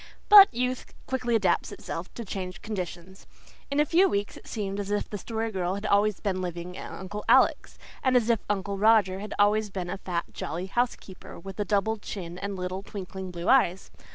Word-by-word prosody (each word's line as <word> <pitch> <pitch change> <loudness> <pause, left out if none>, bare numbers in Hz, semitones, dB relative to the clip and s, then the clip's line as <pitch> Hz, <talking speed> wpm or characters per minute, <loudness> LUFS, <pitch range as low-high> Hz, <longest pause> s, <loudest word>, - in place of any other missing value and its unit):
But 410 -2 +10
youth 250 +1 -3
quickly 250 -3 -1
adapts 190 -6 +1
itself 170 +2 -6
to 235 - -6
changed 185 -2 -6
conditions; 190 -3 -6 0.4
in 280 +1 0
a 300 - +5
few 355 +6 +4
weeks 200 0 -2
it - - -13
seemed 200 -2 -3
as 200 -1 -4
if 205 0 -1
the 205 - -6
Story 225 +2 -3
Girl 185 -2 -1
had 200 +2 -6
always 205 0 +2
been 190 -3 -2
living 175 0 -5
at - - -7
Uncle 205 +3 -6
Alec's, - - +4 0.2
and 255 -1 +4
as 235 -2 +1
if 230 -2 +3
Uncle 200 -1 -2
Roger 205 -3 +4
had 210 +1 -6
always 210 +1 +3
had 180 -2 -3
a 190 - -4
fat, 175 -3 -2
jolly 170 +4 -4
housekeeper 205 -3 -3
with 195 +4 -9
a 205 - 0
double 210 +3 +1
chin 180 -4 -7
and 200 0 -4
little, 185 +1 -4
twinkling 190 -2 -7
blue 175 0 -6
eyes. 195 -9 +3
200 Hz, 200 wpm, -27 LUFS, 185-220 Hz, 0.4 s, But